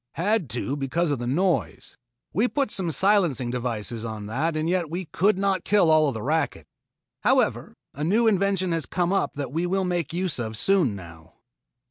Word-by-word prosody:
"Had 185 - 0
to 125 +4 -2
because 145 +4 -1
of 140 - -1
the 120 - -4
noise. 175 +7 -1 0.4
We 215 +8 +2
put 270 0 -1
some 185 -3 +1
silencing 165 - +2
devices 120 -2 -3
on 110 -2 -5
that 145 +10 -1
and 155 +1 -1
yet 175 -2 0
we 175 +3 -4
could 190 +5 +1
not 195 -2 0
kill 200 -6 +3
all 155 -1 +5
of 135 - -2
the 110 - -5
racket. 145 - -1 0.5
However - - +1 0.2
a 145 - -5
new 215 +9 +2
invention 195 -3 +2
has 165 -1 -1
come 180 +1 0
up 195 - 0
that 140 -3 -5
we 170 +3 0
will 190 +1 0
make 175 -4 -1
use 175 -4 -2
of 110 -2 -4
soon 170 - +2
now." 85 -4 -12
165 Hz, 190 wpm, -25 LUFS, 125-190 Hz, 0.5 s, all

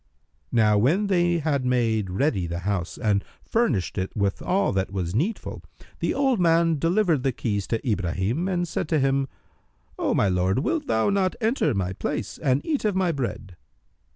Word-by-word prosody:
Now 105 -3 +4
when 165 - +2
they 175 -3 +2
had 145 -4 0
made 115 -5 +1
ready 95 - 0
the 85 +1 -4
house 95 -2 -2
and 105 -4 +1 0.2
furnished 125 - 0
it 95 - -2
with 100 -1 0
all 195 +2 +1
that 95 0 0
was 90 -3 -3
needful, 175 - -2 0.4
the - - 0
old 270 -5 +2
man 165 -2 +3
delivered 170 -2 +2
the 135 0 +1
keys 105 -5 -2
to 115 +3 -2
Ibrahim 100 - -1
and 175 -2 0
said 160 - -3
to 155 - +2
him, 135 0 +1 0.7
"O - - +1
my 100 - +3
lord, 90 0 +1
wilt 300 - -1
thou 110 - +2
not 190 -2 +1
enter 220 - +1
my 95 -1 -1
place - - -4
and 130 0 +1
eat 300 -4 -1
of 210 -3 +1
my 185 -2 +2
bread?" 120 - -4
135 Hz, 180 wpm, -25 LUFS, -, 0.7 s, Now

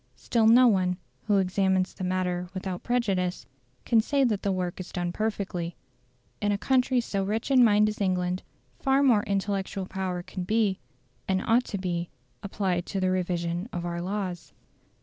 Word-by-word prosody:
Still 225 -2 +1
no 245 +3 +7
one, 185 -4 +2 0.3
who 205 -2 +4
examines 190 0 +1
the 190 - -7
matter 180 -1 -1
without 185 -1 -4
prejudice, 195 -7 0 0.4
can 225 -2 +4
say 280 +4 +1
that 215 -6 +1
the 200 - 0
work 180 -1 -2
is 185 - -7
done 175 -2 -2
perfectly. 190 -5 -3 0.7
In 205 0 +1
a 200 - +1
country 255 +3 +2
so 200 -4 -2
rich 220 +6 -2
in 255 -2 +7
mind 210 -2 +5
as 215 0 -4
England, 180 -1 0 0.4
far 270 0 +3
more 240 -7 +5
intellectual 195 -1 -2
power 185 -2 -3
can 185 0 -6
be, 210 -1 +1 0.5
and 190 0 +1
ought 240 +2 +3
to 200 - -4
be, 175 -2 -2 0.3
applied 190 -3 -2
to 195 - -2
the 185 -1 +1
revision 175 +1 -1
of 175 -1 -4
our 170 0 -3
laws. 185 -2 -4
190 Hz, 170 wpm, -27 LUFS, 180-215 Hz, 0.7 s, no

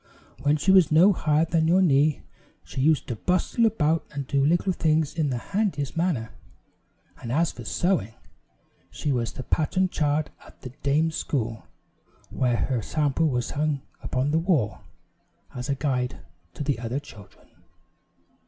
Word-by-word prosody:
When 145 +1 +2
she 190 +6 +2
was 185 -5 +5
no 175 +6 +6
higher 155 -2 +2
than 160 -1 +1
your 180 +3 +4
knee, 150 -4 +3 0.4
she 130 - -5
used 155 +2 +2
to 120 - -3
bustle 185 - +1
about 165 -6 +1
and 140 -2 -4
do 140 +1 +1
little 175 +5 +2
things 155 -2 +1
in 155 -3 0
the 125 - -1
handiest 185 - -2
manner; 165 -10 -1 0.9
and 115 - -5
as 160 +5 +2
for 120 - -10
sewing, 165 - 0 0.7
she 145 - -3
was 120 -3 -1
the 130 - -7
pattern 185 +7 0
child 150 -2 0
at - - -18
the 130 - -6
dame's 155 +4 +1
school, 115 -5 -3 0.6
where 125 -2 +1
her 125 -1 -1
sampler 150 +5 0
was 125 -4 -1
hung 145 -2 -1 0.2
upon 130 +3 -1
the 160 - +2
wall, 150 - 0 0.7
as 125 +1 -6
a 140 - +1
guide 130 - -2 0.3
to - - -4
the 140 -4 -1
other 120 +3 -3
children. 110 -9 -15
150 Hz, 160 wpm, -25 LUFS, 130-165 Hz, 0.9 s, no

